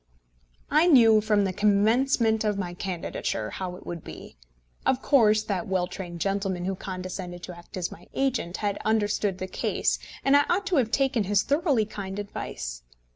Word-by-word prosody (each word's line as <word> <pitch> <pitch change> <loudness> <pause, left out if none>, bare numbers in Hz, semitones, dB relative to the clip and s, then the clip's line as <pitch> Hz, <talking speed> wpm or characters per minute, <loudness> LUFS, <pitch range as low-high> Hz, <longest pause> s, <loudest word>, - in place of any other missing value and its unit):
I 310 +4 +5
knew, 225 -9 +7
from 210 -1 +2
the 190 -1 -1
commencement 220 +3 +3
of 210 -2 0
my 180 -3 -3
candidature, 175 - -3
how 185 -1 -5
it - - -13
would 170 -2 -6
be. - - -10 0.5
Of 255 - +2
course 215 -7 +4
that 190 -5 -3
well 185 -2 +1
trained 180 -2 -7
gentleman 195 -2 -1
who 195 - -1
condescended 185 -1 -6
to 180 - -7
act 170 +2 -11
as 180 -2 -2
my 175 - -13
agent, 255 -10 -1
had 205 -1 -2
understood 205 -3 +1
the 185 - -4
case, 185 - -1 0.3
and 275 +1 +5
I 285 - +5
ought 380 +3 +1
to 380 -5 +1
have 240 -5 +2
taken 255 -4 +1
his 205 +1 +2
thoroughly 285 - +2
kind 195 -2 -6
advice. 60 - -5
205 Hz, 180 wpm, -26 LUFS, 185-230 Hz, 0.5 s, knew